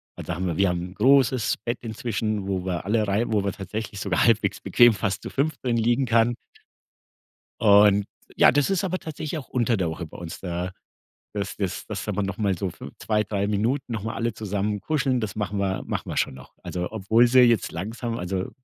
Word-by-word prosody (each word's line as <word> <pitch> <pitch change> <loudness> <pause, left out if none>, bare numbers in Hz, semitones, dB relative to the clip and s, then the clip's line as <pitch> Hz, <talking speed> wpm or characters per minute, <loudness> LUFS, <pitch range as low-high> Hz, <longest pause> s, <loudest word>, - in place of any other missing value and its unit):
Also, 90 - -5
haben 90 +1 -2
wir 85 - -2
wir 100 - +4
haben 85 -1 -1
'n 90 +1 -7
großes 130 0 +3
Bett 120 +1 -2
inzwischen, 110 -3 -2
wo 95 -2 -2
wir 90 -1 -3
alle 105 0 +1
rein 105 +4 0
wo 105 -2 +2
wir 100 - 0
tatsächlich 105 +1 -6
sogar 100 -3 +1
halbwegs 110 -3 +2
bequem 120 -1 +5
fast 100 -1 -2
zu - - -6
5. 150 +3 -1
drin 120 -2 +1
liegen 120 +3 +2
kann. 115 0 +3 1.3
Und 105 -1 +6 0.3
ja, - - +6
das 145 +7 +2
ist 195 0 +1
aber 185 0 -1
tatsächlich 155 -1 -5
auch 140 - -8
unter 120 -2 +1
der 90 -3 0
Woche 80 +2 -5
bei - - -12
uns 85 -2 -7
da 90 0 -3 0.6
dass 100 -1 -3
dass 95 -3 -3
dass - - -5
da 105 - -2
noch 100 0 -2
mal 100 -4 +1
so 95 +1 -2
5 - - -10
2, 105 -1 0
3 100 0 -1
Minuten 120 +6 -1
noch 110 -3 -3
mal 115 - -3
alle 115 -1 -2
zusammen 105 0 -2
kuscheln, 135 +1 0
das 110 -4 -3
machen 105 -1 -3
wir 95 -1 -1
machen - - -3
wir - - -4
schon - - 0
noch. 65 - -13
Also, 90 -1 -4
obwohl 110 +3 +4
sie 130 +2 +5
jetzt 120 -3 +4
langsam 115 +6 -4
also, 90 +1 -3
105 Hz, 215 wpm, -25 LUFS, 95-120 Hz, 1.3 s, Und